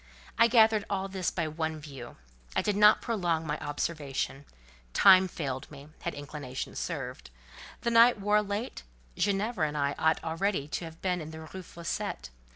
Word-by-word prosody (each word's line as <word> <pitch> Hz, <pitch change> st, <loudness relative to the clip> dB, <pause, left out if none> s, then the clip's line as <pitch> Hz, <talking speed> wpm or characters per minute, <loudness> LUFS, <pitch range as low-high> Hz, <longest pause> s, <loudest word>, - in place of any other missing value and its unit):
I 230 Hz, -, +6 dB
gathered 220 Hz, -2 st, +5 dB
all 195 Hz, -1 st, -1 dB
this 190 Hz, -2 st, -2 dB
by 170 Hz, -3 st, -2 dB
one 160 Hz, 0 st, -3 dB
view. 135 Hz, -5 st, -10 dB, 0.4 s
I -, -, +2 dB
did 210 Hz, -, 0 dB
not 210 Hz, +1 st, +6 dB
prolong 175 Hz, -8 st, 0 dB
my 150 Hz, 0 st, -2 dB
observation—time 140 Hz, -, +1 dB
failed 135 Hz, -7 st, -4 dB
me, 145 Hz, 0 st, -12 dB
had -, -, -4 dB
inclination 145 Hz, -2 st, -6 dB
served: 135 Hz, -, -5 dB, 0.5 s
the 235 Hz, -, 0 dB
night 230 Hz, 0 st, +6 dB
wore 210 Hz, +1 st, +3 dB
late; 205 Hz, +4 st, -4 dB, 0.3 s
Ginevra 200 Hz, -3 st, 0 dB
and 150 Hz, 0 st, -4 dB
I 140 Hz, 0 st, +1 dB
ought 160 Hz, 0 st, +2 dB
already 165 Hz, -1 st, -1 dB
to 170 Hz, -, -3 dB
have 165 Hz, 0 st, -11 dB
been 180 Hz, -2 st, 0 dB
in 155 Hz, -, -7 dB
the 160 Hz, 0 st, -9 dB
Rue 175 Hz, +4 st, -8 dB
Fossette. 170 Hz, -, -5 dB
165 Hz, 160 wpm, -29 LUFS, 145-200 Hz, 0.5 s, I